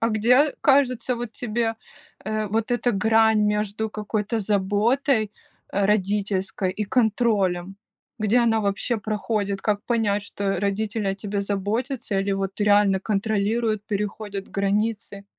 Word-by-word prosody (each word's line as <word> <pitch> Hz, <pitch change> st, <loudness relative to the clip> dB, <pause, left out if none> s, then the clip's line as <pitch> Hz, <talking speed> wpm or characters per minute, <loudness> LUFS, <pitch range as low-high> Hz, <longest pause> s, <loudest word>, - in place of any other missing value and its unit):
А 230 Hz, -, +2 dB
где, 250 Hz, +7 st, +3 dB
кажется, 255 Hz, -3 st, +3 dB
вот 235 Hz, -1 st, -5 dB
тебе, 230 Hz, -1 st, -2 dB, 0.5 s
э, 215 Hz, 0 st, -2 dB
вот 225 Hz, +3 st, -1 dB
эта 245 Hz, 0 st, +1 dB
грань 220 Hz, +1 st, +3 dB
между 210 Hz, +1 st, 0 dB
какой-то 215 Hz, +1 st, -2 dB
заботой 215 Hz, +4 st, +1 dB, 0.4 s
родительской 200 Hz, -1 st, 0 dB
и 210 Hz, +3 st, -3 dB
контролем? 200 Hz, -5 st, +1 dB, 0.4 s
Где 215 Hz, +3 st, +2 dB
она 225 Hz, -2 st, +3 dB
вообще 205 Hz, +4 st, 0 dB
проходит? 210 Hz, -1 st, -2 dB
Как 205 Hz, -1 st, 0 dB
понять, 210 Hz, -4 st, +1 dB
что 200 Hz, -2 st, -2 dB
родители 205 Hz, +1 st, -1 dB
о 195 Hz, -, 0 dB
тебе 200 Hz, +1 st, -3 dB
заботятся 205 Hz, +3 st, -2 dB
или 195 Hz, +1 st, 0 dB
вот 195 Hz, +1 st, -3 dB
реально 205 Hz, -2 st, +4 dB
контролируют, 215 Hz, +1 st, 0 dB
переходят 205 Hz, -1 st, -4 dB
границы? 200 Hz, 0 st, -1 dB
210 Hz, 125 wpm, -24 LUFS, 200-225 Hz, 0.5 s, реально